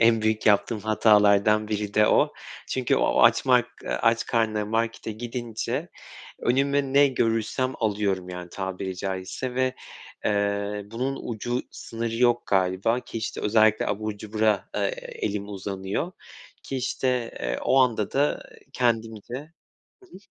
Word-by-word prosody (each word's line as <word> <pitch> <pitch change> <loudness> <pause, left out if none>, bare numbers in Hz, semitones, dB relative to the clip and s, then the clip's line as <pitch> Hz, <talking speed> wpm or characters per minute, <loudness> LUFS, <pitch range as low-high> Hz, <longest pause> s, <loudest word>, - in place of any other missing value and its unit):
en 115 -1 +4
büyük 110 0 0
yaptığım 105 +1 +3
hatalardan 105 0 +4
biri 105 -1 -3
de 105 0 +5
o. - - +3 0.4
Çünkü 130 -2 +1
o - - +3
açmak 125 -2 +5 0.2
eee, - - -4
aç 115 0 +1
karnına 110 -3 +1
markete 115 0 -2
gidince 120 0 -4 0.5
önüme 140 +2 +1
ne 140 +1 +6
görürsem 120 +1 0
alıyorum, 100 -4 0
yani, 90 -1 -7
tabiri 95 0 -4
caizse. 95 +7 -4
Ve, 130 0 +1 0.5
eee, 100 0 0
bunun 130 +4 -2
ucu 120 +2 -2
sınırı 115 0 -5
yok 120 0 +2
galiba. 95 +5 +1
Ki, 115 - -7
işte, 110 - -4
özellikle 110 0 +3
abur 110 0 -2
cubura, 110 -1 0
eee, 100 -1 +1 0.3
elim 100 -1 -2
uzanıyor. 100 - -4 0.5
Ki, 135 - -5
işte, 125 -1 -1
eee, - - -2
o - - +3
anda 115 -5 +1
da, 145 +2 +1
eee, - - -17
kendimce 115 -2 -1 0.7
Hı - - -16
hı. 350 - -14
110 Hz, 140 wpm, -25 LUFS, 100-120 Hz, 0.7 s, ne